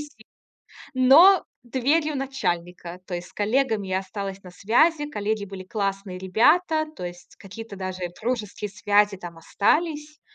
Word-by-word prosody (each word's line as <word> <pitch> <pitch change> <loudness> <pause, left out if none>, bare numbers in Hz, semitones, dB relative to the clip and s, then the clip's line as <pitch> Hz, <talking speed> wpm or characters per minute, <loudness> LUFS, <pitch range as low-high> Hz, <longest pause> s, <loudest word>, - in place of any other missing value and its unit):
силы, 295 0 -8 0.8
но 285 +10 +7 0.2
дверью 285 +6 0
начальника. 180 -10 -3
То 185 - -7
есть 175 0 -5
с - - -23
коллегами 220 -1 0
я 185 - +1
осталась 195 0 -6
на 180 - -11
связи, 295 - +2
коллеги 210 -5 -2
были 195 -1 -8
классные 195 -1 -3
ребята. 310 - +2
То 180 - -8
есть 175 0 -10
какие-то 210 +2 -10
даже 185 -1 -5 0.2
дружеские 215 -3 -3
связи 205 0 +2
там 175 -2 -9
остались. 300 - -1
210 Hz, 140 wpm, -24 LUFS, 190-270 Hz, 0.8 s, но